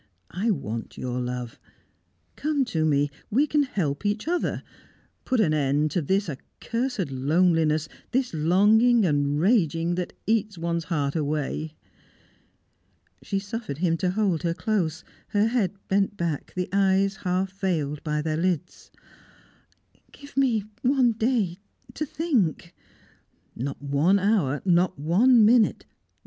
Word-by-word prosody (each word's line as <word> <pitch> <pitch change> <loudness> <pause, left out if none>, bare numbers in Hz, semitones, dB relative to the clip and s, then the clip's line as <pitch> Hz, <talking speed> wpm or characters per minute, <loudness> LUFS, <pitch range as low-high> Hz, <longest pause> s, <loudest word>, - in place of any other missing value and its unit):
I 200 +6 -1
want 115 - -3
your 125 0 -3
love. 125 -1 -5 0.8
Come 290 -2 0
to 160 -9 -1
me 145 -1 +2 0.2
we 270 +8 +3
can 300 0 +2
help 175 - -2
each 210 +5 -1
other 350 +1 -1 0.6
put 255 - +1
an 170 -8 +3
end 145 +1 +1
to 180 - 0
this 190 +7 0
accursed 230 - -4
loneliness, 155 +2 +2 0.2
this 255 -3 -1
longing 210 +8 +4
and 145 -2 +1
raging 170 -4 +2
that 180 0 -3
eats 215 -3 0
one's 170 0 -2
heart 145 -4 -1
away!" 155 0 -2 1.5
She 200 - -3
suffered 200 - -5
him 165 0 +1
to 185 - 0
hold 190 -4 0
her 170 -1 -1
close 170 -4 -1 0.2
her 205 0 +2
head 225 -6 +1 0.2
bent 200 +1 +1
back, 165 -5 -3
the 180 0 -2
eyes 195 0 +2
half 185 +1 -1
veiled 160 -7 -2
by 150 -1 -1
their 155 -1 -1
lids. 180 0 -2 1.2
"Give 285 0 -14
me 250 -6 +2 0.2
one 255 -2 +3
day 220 -5 0 0.3
to 305 - -3
think 265 - -1 0.4
" - - -41
"Not 135 +3 -4
one 145 +7 +3
hour, 190 -9 +1
not 180 -2 +2
one 215 - +4
minute! 225 0 +3
180 Hz, 135 wpm, -25 LUFS, 155-220 Hz, 1.5 s, longing